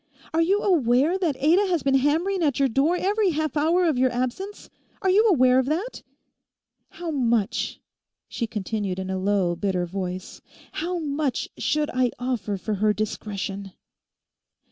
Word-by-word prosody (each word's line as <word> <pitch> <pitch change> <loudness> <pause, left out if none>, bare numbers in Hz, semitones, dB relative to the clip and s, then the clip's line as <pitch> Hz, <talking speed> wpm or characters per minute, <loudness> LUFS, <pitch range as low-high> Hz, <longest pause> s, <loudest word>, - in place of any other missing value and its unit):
Are 325 - +3
you 390 +5 +2
aware 295 - +3
that 330 -7 0
Ada 340 +8 +3
has 350 -4 0
been 275 - +2
hammering 320 +8 +2
at 290 -5 +1
your 275 - +3
door 275 +8 +2
every 405 +1 +2
half 310 -3 -2
hour 330 +5 +3
of 305 -7 +1
your 260 0 +3
absence? 255 +12 -4 0.4
Are 380 - +3
you 430 +4 +5
aware 255 -7 +5
of 260 - 0
that? 360 - -2 0.9
How 340 -1 -6
much,' 235 -7 0 0.5
she 230 - -3
continued 210 -3 -3
in 190 0 -4
a 190 - -2
low, 190 -3 +1
bitter 180 0 -1
voice, 185 0 -5 0.3
'how 350 +3 -3
much 295 -4 -2
should 300 0 0
I 255 -1 +2
offer 235 -5 -2
for 215 +3 -3
her 215 0 +4
discretion? 200 -2 -4
270 Hz, 160 wpm, -24 LUFS, 210-335 Hz, 0.9 s, you